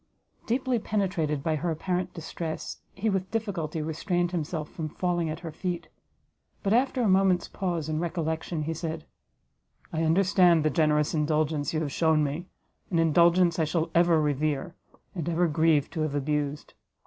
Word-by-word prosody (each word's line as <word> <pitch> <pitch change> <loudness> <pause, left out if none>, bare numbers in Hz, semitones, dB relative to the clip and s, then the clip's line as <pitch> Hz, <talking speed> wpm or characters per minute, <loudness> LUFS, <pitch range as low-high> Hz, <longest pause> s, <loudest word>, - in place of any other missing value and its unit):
Deeply 250 0 +1
penetrated 180 -9 -1
by 160 -1 +1
her 170 +3 -2
apparent 180 +3 -2
distress, 165 -1 -5
he 200 +3 -2
with 190 -3 0
difficulty 175 -9 -2
restrained 175 +3 -1
himself 160 -2 -3
from 155 -2 -5
falling 175 -1 -1
at 155 +2 -5
her 165 -3 -6
feet; 175 0 -4 0.7
but 200 0 +2
after 255 +1 +2
a - - +3
moment's 190 -2 +3
pause 175 -5 -3
and 155 0 -1
recollection, 160 -1 -2
he 160 +2 -2
said, 160 -1 -5 0.9
"I 160 - 0
understand 175 -1 +4
the 155 - +3
generous 150 0 +2
indulgence 150 -2 0
you 155 - -1
have 145 -3 -2
shewn 160 -1 +3
me, 150 +5 -3 0.4
an 175 - 0
indulgence 170 +2 +4
I 160 - +3
shall 160 +1 -1
ever 170 -1 +4
revere, 150 +2 0 0.4
and 170 -3 -3
ever 170 +1 +2
grieve 155 -2 +3
to 160 - -3
have 155 -2 -1
abused. 145 0 -2
165 Hz, 160 wpm, -27 LUFS, 155-180 Hz, 0.9 s, understand